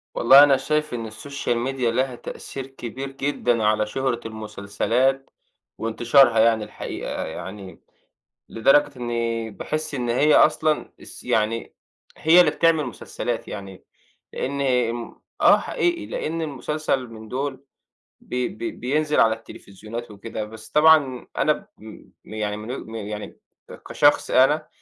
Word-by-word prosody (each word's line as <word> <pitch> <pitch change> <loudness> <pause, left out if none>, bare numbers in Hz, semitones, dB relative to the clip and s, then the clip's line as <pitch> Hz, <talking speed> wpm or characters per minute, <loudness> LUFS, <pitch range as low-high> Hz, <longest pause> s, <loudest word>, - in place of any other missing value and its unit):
والله 135 +4 +8
أنا 140 -2 +5
شايف 150 0 -1
إن 115 -2 -5
الsocial 120 0 -3
media 135 - -6
لها 125 +2 0
تأثير 135 +2 -8
كبير 135 +1 -7
جدًا 130 -4 -1
على 105 0 +2
شهرة 130 +1 -1
المسلسلات 115 +5 -1 0.5
وإنتشارها، 120 +2 +4
يعني 110 -1 +4
الحقيقة - - -5
يعني 95 -3 -8 0.7
لدرجة 140 +4 +3
إني 115 -2 -2
باحس 155 +7 -4
إن 120 -2 -2
هي 145 +6 +4
أصلًا 155 0 +3
الس - - -12
يعني 110 +1 -1 0.4
هي 165 +3 +5
اللي 180 - +6
بتعمِل 165 -3 +2
مسلسلات 125 - -5
يعني؛ 95 -2 -8 0.5
لإن 140 +1 -3
آآ 125 -4 +2
م 120 0 -8 0.2
آه - - +7
حقيقي، 345 -1 -1
لإن 165 +2 -3
المسلسل 150 -2 -2
من 110 -1 -11
دول 135 +3 -4 0.6
بي 125 0 -3
بي 335 - -5
بينزِل 150 - 0
على 110 -1 +5
التليفزيونات 115 +1 -10
وكده، 110 +2 -6
بس 110 +1 -12
طبعًا 150 -5 +4
أنا - - +3
ب - - -11
م - - -14
يعني 105 -1 -2
من 110 +3 -7
وج 130 - -6
م 110 - -9
يعني 105 -1 -6 0.5
كشخص 145 0 +3
أنا 135 +4 +4
125 Hz, 140 wpm, -23 LUFS, 110-140 Hz, 0.7 s, والله